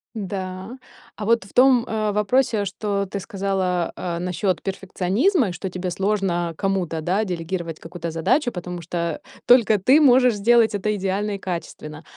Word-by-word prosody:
Да. 190 Hz, +1 st, -5 dB, 0.4 s
А 210 Hz, -, -6 dB
вот 230 Hz, -1 st, +2 dB
в 190 Hz, -, -17 dB
том, 250 Hz, -2 st, +5 dB
э, 215 Hz, -1 st, -1 dB
вопросе, 210 Hz, +1 st, +1 dB
что 200 Hz, 0 st, -2 dB
ты 200 Hz, +1 st, -5 dB
сказала, 190 Hz, -3 st, -1 dB
а, 170 Hz, -1 st, -4 dB
насчет 180 Hz, +1 st, -1 dB
перфекционизма, 195 Hz, -, 0 dB
и -, -, -4 dB
что 175 Hz, +2 st, -5 dB
тебе 180 Hz, 0 st, -4 dB
сложно 190 Hz, -3 st, -1 dB
кому-то, 190 Hz, -5 st, -1 dB
да, 185 Hz, +7 st, 0 dB
делегировать 170 Hz, -2 st, -4 dB
какую-то 170 Hz, 0 st, -6 dB
задачу, 245 Hz, -, +1 dB
потому 180 Hz, -2 st, -6 dB
что 170 Hz, -1 st, -3 dB, 0.2 s
только 230 Hz, -4 st, +5 dB
ты 260 Hz, +11 st, +4 dB
можешь 250 Hz, -3 st, +5 dB
сделать 225 Hz, +2 st, +4 dB
это 210 Hz, +1 st, -1 dB
идеально 195 Hz, +2 st, -2 dB
и -, -, -5 dB
качественно, 165 Hz, -4 st, -6 dB
195 Hz, 160 wpm, -22 LUFS, 180-215 Hz, 0.4 s, том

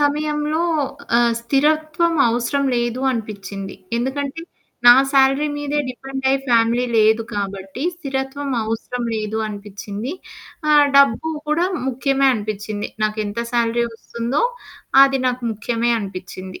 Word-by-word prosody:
సమయంలో. 300 Hz, +2 st, 0 dB, 0.5 s
ఆహ్ 235 Hz, -1 st, +3 dB
స్థిరత్వం 310 Hz, +6 st, +1 dB
అవసరం 245 Hz, +4 st, 0 dB
లేదు 240 Hz, +1 st, -1 dB
అనిపిచ్చింది. 200 Hz, -4 st, -5 dB, 0.2 s
ఎందుకంటే 275 Hz, +5 st, -3 dB, 0.5 s
నా 240 Hz, -, +12 dB, 0.2 s
శాలరీ 270 Hz, +2 st, +4 dB
మీదే 290 Hz, 0 st, -2 dB
డిపెండయి 265 Hz, +1 st, -1 dB
ఫ్యామిలీ 235 Hz, 0 st, +3 dB
లేదు 220 Hz, +1 st, +4 dB
కాబట్టి 195 Hz, +3 st, -4 dB
స్థిరత్వం 275 Hz, -2 st, -4 dB
అవసరం 225 Hz, +3 st, -3 dB
లేదు 215 Hz, 0 st, -2 dB
అనిపిచ్చింది. 205 Hz, +3 st, -6 dB, 0.6 s
ఆహ్, 295 Hz, -1 st, +6 dB
డబ్బు 280 Hz, +1 st, +4 dB, 0.2 s
కూడా 325 Hz, +4 st, +2 dB, 0.2 s
ముఖ్యమే 275 Hz, +1 st, +1 dB
అనిపిచ్చింది. 210 Hz, -1 st, -4 dB, 0.2 s
నాకెంత 215 Hz, 0 st, -2 dB
శాలరీ 235 Hz, 0 st, +1 dB
వస్తుందో. 235 Hz, -, -2 dB, 0.6 s
అది 270 Hz, 0 st, +4 dB
నాకు 250 Hz, 0 st, -1 dB
ముఖ్యమే 230 Hz, +2 st, -1 dB
అనిపిచ్చింది. 185 Hz, -2 st, -7 dB
240 Hz, 110 wpm, -20 LUFS, 215-280 Hz, 0.6 s, నా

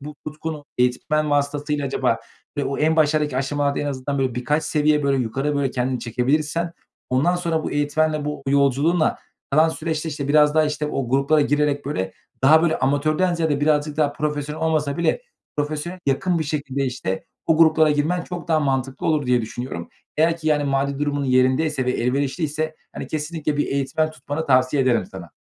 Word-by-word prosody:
bu 150 Hz, +2 st, -8 dB
tutkunu 155 Hz, 0 st, -5 dB
eğitmen 150 Hz, +5 st, +1 dB
vasıtasıyla 145 Hz, 0 st, 0 dB
acaba 135 Hz, -, 0 dB, 0.4 s
ve 145 Hz, -, 0 dB
o 135 Hz, -, -2 dB
en 160 Hz, +1 st, +2 dB
başlardaki 150 Hz, -3 st, +2 dB
aşamalarda 140 Hz, +1 st, 0 dB
en 145 Hz, -, -2 dB
azından, 140 Hz, 0 st, -3 dB
böyle, 130 Hz, -3 st, 0 dB
birkaç 145 Hz, +6 st, 0 dB
seviye, 150 Hz, 0 st, +2 dB
böyle, 140 Hz, -1 st, +2 dB
yukarı, 135 Hz, +6 st, -1 dB
böyle, 140 Hz, -2 st, 0 dB
kendini 125 Hz, 0 st, -1 dB
çekebilirsen, 150 Hz, +8 st, -1 dB, 0.4 s
ondan 150 Hz, +8 st, +2 dB
sonra 165 Hz, -3 st, -1 dB
bu -, -, -2 dB
eğitmenle, 150 Hz, +1 st, 0 dB
bu 150 Hz, -1 st, -4 dB
yolculuğunla 140 Hz, +4 st, +2 dB, 0.3 s
kalan 155 Hz, +3 st, +4 dB
süreçte, 160 Hz, 0 st, -3 dB
işte, 140 Hz, -2 st, -4 dB
biraz 150 Hz, 0 st, +5 dB
daha, 155 Hz, 0 st, +4 dB
işte, 150 Hz, 0 st, -2 dB
o 135 Hz, -4 st, -2 dB
gruplara 140 Hz, +4 st, +3 dB
girerek, 145 Hz, 0 st, +1 dB
böyle, 95 Hz, -10 st, -2 dB, 0.3 s
daha 155 Hz, +4 st, +6 dB
böyle 165 Hz, -2 st, +1 dB
amatörden 155 Hz, +6 st, +1 dB
ziyade 160 Hz, -4 st, 0 dB
birazcık 150 Hz, 0 st, +1 dB
daha 150 Hz, -2 st, +2 dB
profesyonel 150 Hz, +1 st, -3 dB
olmasa 150 Hz, -3 st, 0 dB
bile 170 Hz, -, 0 dB, 0.3 s
profesyonele 155 Hz, +5 st, -3 dB
yakın 170 Hz, +6 st, +1 dB
bir 160 Hz, -, -1 dB
şekilde, 140 Hz, -2 st, -2 dB
işte, 125 Hz, -7 st, -3 dB, 0.2 s
o 160 Hz, -, +3 dB
gruplara 160 Hz, -1 st, +5 dB
girmen 155 Hz, +4 st, +1 dB
çok 175 Hz, -1 st, -7 dB
daha 160 Hz, -1 st, +3 dB
mantıklı 135 Hz, -2 st, -1 dB
olur 150 Hz, -4 st, +1 dB
diye 125 Hz, -1 st, +3 dB
düşünüyorum. 110 Hz, -6 st, -6 dB, 0.3 s
Eğer 165 Hz, +2 st, +3 dB
ki, 160 Hz, -, -8 dB
yani, 150 Hz, -1 st, +2 dB
mali 140 Hz, 0 st, 0 dB
durumun 145 Hz, -1 st, -1 dB
yerindeyse 130 Hz, +3 st, +2 dB
ve -, -, +2 dB
elverişliyse, 145 Hz, +5 st, -1 dB, 0.2 s
hani, -, -, -5 dB
kesinlikle 155 Hz, -1 st, -3 dB
bir 145 Hz, -, +1 dB
eğitmen 140 Hz, +3 st, 0 dB
tutmanı 155 Hz, +1 st, -5 dB
tavsiye 130 Hz, 0 st, +3 dB
ederim 125 Hz, -3 st, +2 dB
sana. 90 Hz, -4 st, -10 dB
145 Hz, 175 wpm, -22 LUFS, 135-155 Hz, 0.4 s, daha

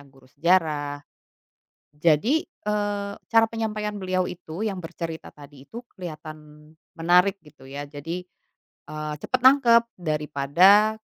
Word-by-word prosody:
guru 135 Hz, -1 st, -22 dB
sejarah. 150 Hz, 0 st, +1 dB, 0.9 s
Jadi, 165 Hz, -, +2 dB
eee, 205 Hz, -, -3 dB
cara 225 Hz, 0 st, +4 dB
penyampaian 215 Hz, -2 st, -3 dB
beliau 185 Hz, -1 st, -1 dB
itu 170 Hz, +2 st, -7 dB
yang 205 Hz, -4 st, -2 dB
bercerita 165 Hz, -1 st, -7 dB
tadi 140 Hz, -2 st, -15 dB
itu, 235 Hz, +2 st, -9 dB
kelihatan 155 Hz, -3 st, -10 dB, 0.2 s
menarik 180 Hz, +3 st, +3 dB
gitu 150 Hz, -3 st, -17 dB
ya. 140 Hz, +2 st, -6 dB
Jadi, 145 Hz, +5 st, -6 dB, 0.7 s
eee, 155 Hz, 0 st, -5 dB
cepat 255 Hz, -, -1 dB
nangkep 255 Hz, -3 st, +6 dB, 0.2 s
daripada 165 Hz, +7 st, +3 dB
170 Hz, 115 wpm, -24 LUFS, 150-205 Hz, 0.9 s, nangkep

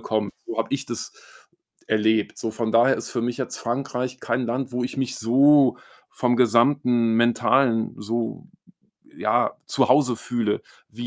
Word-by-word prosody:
kommt. 110 Hz, -2 st, -2 dB
So 115 Hz, -, -6 dB
habe 115 Hz, 0 st, -1 dB
ich 135 Hz, 0 st, -4 dB
das 120 Hz, -2 st, -6 dB, 0.7 s
erlebt. 110 Hz, 0 st, +1 dB
So 115 Hz, -, -3 dB
von 110 Hz, 0 st, -3 dB
daher 120 Hz, +4 st, +4 dB
ist -, -, -6 dB
für 120 Hz, -, -2 dB
mich 120 Hz, 0 st, -2 dB
jetzt 130 Hz, -, -4 dB
Frankreich 125 Hz, +1 st, -3 dB
kein 125 Hz, +1 st, -1 dB
Land, 125 Hz, +2 st, -3 dB
wo 125 Hz, 0 st, -2 dB
ich 130 Hz, -, -6 dB
mich 130 Hz, -1 st, -2 dB
so 135 Hz, +3 st, +4 dB, 0.3 s
vom 125 Hz, -1 st, 0 dB
gesamten 120 Hz, -1 st, +3 dB
Mentalen 120 Hz, 0 st, +2 dB
so 115 Hz, +2 st, -4 dB, 0.7 s
ja, -, -, +1 dB
zu -, -, +1 dB
Hause 130 Hz, -5 st, +3 dB
fühle 115 Hz, -3 st, -2 dB, 0.3 s
wie 120 Hz, +3 st, -8 dB
120 Hz, 155 wpm, -23 LUFS, 115-130 Hz, 0.7 s, daher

